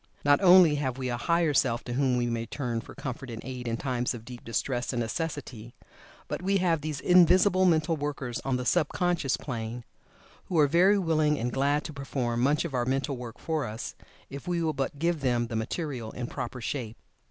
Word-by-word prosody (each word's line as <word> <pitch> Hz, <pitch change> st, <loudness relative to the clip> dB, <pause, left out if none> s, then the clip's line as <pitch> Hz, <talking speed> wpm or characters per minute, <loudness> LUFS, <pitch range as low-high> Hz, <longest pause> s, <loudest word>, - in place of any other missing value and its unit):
Not 145 Hz, +3 st, +5 dB
only 180 Hz, -4 st, +7 dB
have 130 Hz, -3 st, -2 dB
we 130 Hz, -1 st, -3 dB
a 120 Hz, -, -1 dB
Higher 170 Hz, +4 st, +1 dB
Self 120 Hz, -3 st, +2 dB
to 120 Hz, -, -5 dB
whom 130 Hz, -1 st, +2 dB
we 120 Hz, -, +1 dB
may 115 Hz, -1 st, -2 dB
turn 120 Hz, -3 st, -3 dB
for -, -, -13 dB
comfort 130 Hz, 0 st, -6 dB
and 115 Hz, -1 st, -6 dB
aid 125 Hz, -2 st, -6 dB
in 115 Hz, 0 st, -1 dB
times 125 Hz, -2 st, -1 dB
of 115 Hz, -1 st, -10 dB
deep 125 Hz, -1 st, -10 dB
distress 120 Hz, +2 st, -2 dB
and 120 Hz, -, -2 dB
necessity, 120 Hz, -3 st, -4 dB, 0.5 s
but -, -, -4 dB
we 195 Hz, +2 st, +2 dB
have 170 Hz, -4 st, +1 dB
these 150 Hz, -1 st, -4 dB
invisible 185 Hz, +2 st, +5 dB
mental 165 Hz, -2 st, +3 dB
workers 145 Hz, -5 st, -4 dB
on 135 Hz, -2 st, 0 dB
the 125 Hz, -, -4 dB
sub 155 Hz, +2 st, +3 dB
conscious 175 Hz, -6 st, 0 dB
plane, 120 Hz, -2 st, -5 dB, 0.6 s
who 180 Hz, -, -2 dB
are 150 Hz, -, +6 dB
very 180 Hz, +7 st, +4 dB
willing 155 Hz, -5 st, +2 dB
and 120 Hz, 0 st, -2 dB
glad 145 Hz, +2 st, +1 dB
to 155 Hz, -, -7 dB
perform 130 Hz, -4 st, -2 dB
much 145 Hz, +5 st, +2 dB
of 160 Hz, -, -5 dB
our 125 Hz, -1 st, +1 dB
mental 135 Hz, +2 st, -1 dB
work 120 Hz, -2 st, -8 dB
for 160 Hz, -3 st, -2 dB
us, 110 Hz, +2 st, -6 dB, 0.3 s
if 140 Hz, +5 st, -9 dB
we 175 Hz, -1 st, 0 dB
will 160 Hz, -1 st, 0 dB
but 135 Hz, 0 st, -3 dB
give 170 Hz, +2 st, 0 dB
them 120 Hz, -3 st, +1 dB
the 115 Hz, -, -6 dB
material 120 Hz, +1 st, -3 dB
in 125 Hz, -, -4 dB
proper 125 Hz, 0 st, -5 dB
shape. 120 Hz, -3 st, -4 dB
135 Hz, 210 wpm, -28 LUFS, 120-160 Hz, 0.6 s, only